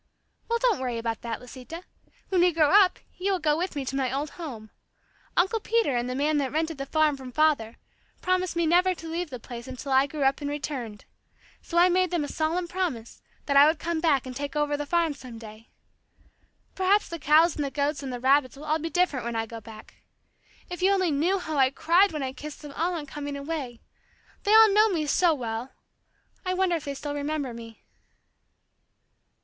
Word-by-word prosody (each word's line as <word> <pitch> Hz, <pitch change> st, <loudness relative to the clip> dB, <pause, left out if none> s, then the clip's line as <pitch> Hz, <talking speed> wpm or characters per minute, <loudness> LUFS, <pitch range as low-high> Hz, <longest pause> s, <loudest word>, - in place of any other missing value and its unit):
"Well, 470 Hz, -, +2 dB
don't 475 Hz, -, +2 dB
worry 250 Hz, -2 st, -2 dB
about 230 Hz, -1 st, -3 dB
that, 230 Hz, -1 st, -4 dB
Lisita. 260 Hz, +7 st, -10 dB, 0.5 s
When 370 Hz, -2 st, +2 dB
we 355 Hz, 0 st, +5 dB
grow 310 Hz, -3 st, +3 dB
up, 390 Hz, -2 st, +6 dB, 0.2 s
you 390 Hz, +2 st, 0 dB
will 380 Hz, -, +2 dB
go 305 Hz, -3 st, +1 dB
with 350 Hz, +1 st, -3 dB
me 280 Hz, -2 st, -3 dB
to 265 Hz, -, -4 dB
my 265 Hz, -2 st, 0 dB
old 280 Hz, +3 st, -3 dB
home. 235 Hz, -11 st, -8 dB, 0.7 s
Uncle 385 Hz, +6 st, +2 dB
Peter 440 Hz, -, +1 dB
and 240 Hz, +1 st, -1 dB
the 250 Hz, -, -3 dB
man 295 Hz, +2 st, +1 dB
that 270 Hz, -2 st, -1 dB
rented 320 Hz, -1 st, -2 dB
the 275 Hz, -, -4 dB
farm 310 Hz, -1 st, +2 dB
from 260 Hz, -2 st, -9 dB
father, 280 Hz, -6 st, +1 dB, 0.4 s
promised 370 Hz, -1 st, 0 dB
me 340 Hz, 0 st, +1 dB
never 360 Hz, +3 st, +3 dB
to 330 Hz, -, -9 dB
leave 335 Hz, +1 st, -3 dB
the 250 Hz, -3 st, -7 dB
place 235 Hz, +1 st, -9 dB
until 260 Hz, +1 st, -6 dB
I 265 Hz, +1 st, +4 dB
grew 290 Hz, 0 st, -3 dB
up 270 Hz, +2 st, +2 dB
and 285 Hz, -, -3 dB
returned. 270 Hz, -7 st, -5 dB, 0.6 s
So 340 Hz, -, -4 dB
I 350 Hz, +1 st, +7 dB
made 365 Hz, 0 st, +2 dB
them 345 Hz, -3 st, -1 dB
a -, -, -3 dB
solemn 325 Hz, +4 st, -1 dB
promise 340 Hz, -11 st, -4 dB, 0.2 s
that 280 Hz, -, 0 dB
I 280 Hz, +1 st, +8 dB
would 315 Hz, +1 st, +2 dB
come 335 Hz, 0 st, -2 dB
back 290 Hz, -6 st, +2 dB
and 255 Hz, -1 st, -7 dB
take 285 Hz, +2 st, -5 dB
over 295 Hz, -1 st, +1 dB
the 290 Hz, 0 st, -4 dB
farm 335 Hz, -1 st, +1 dB
some 255 Hz, -4 st, -11 dB
day. 220 Hz, 0 st, -12 dB, 1.0 s
Perhaps 385 Hz, +2 st, +2 dB
the 335 Hz, -, -6 dB
cows 310 Hz, +3 st, +4 dB
and 295 Hz, -, -2 dB
the 280 Hz, -, -2 dB
goats 285 Hz, +1 st, -1 dB
and 270 Hz, -2 st, -5 dB
the 245 Hz, -, -5 dB
rabbits 265 Hz, +1 st, +3 dB
will 290 Hz, +2 st, -10 dB
all 310 Hz, +1 st, +1 dB
be 325 Hz, +2 st, -4 dB
different 355 Hz, -8 st, +1 dB
when 235 Hz, 0 st, -4 dB
I 225 Hz, 0 st, -1 dB
go 225 Hz, 0 st, -9 dB
back. 215 Hz, -1 st, -14 dB, 0.7 s
If 355 Hz, +1 st, -7 dB
you 380 Hz, +2 st, +4 dB
only 375 Hz, -4 st, +2 dB
knew 330 Hz, +7 st, +1 dB
how 315 Hz, -5 st, -4 dB
I 260 Hz, -1 st, +5 dB
cried 345 Hz, +8 st, +3 dB
when 305 Hz, -3 st, -3 dB
I 260 Hz, 0 st, -3 dB
kissed 295 Hz, +3 st, -9 dB
them 290 Hz, -1 st, -9 dB
all 345 Hz, +3 st, 0 dB
on 310 Hz, -3 st, -5 dB
coming 285 Hz, 0 st, -6 dB
away. 280 Hz, -5 st, -5 dB, 0.6 s
They 420 Hz, +2 st, +5 dB
all 440 Hz, -2 st, +8 dB
know 430 Hz, +2 st, +5 dB
me 330 Hz, -6 st, -1 dB
so 330 Hz, +2 st, +3 dB
well. 235 Hz, -1 st, -5 dB, 0.7 s
I 370 Hz, -1 st, -1 dB
wonder 370 Hz, -2 st, +2 dB
if 315 Hz, -, -5 dB
they 280 Hz, -1 st, -4 dB
still 290 Hz, +1 st, -5 dB
remember 290 Hz, -3 st, -3 dB
me." 230 Hz, -1 st, -11 dB
295 Hz, 220 wpm, -26 LUFS, 265-345 Hz, 1.0 s, I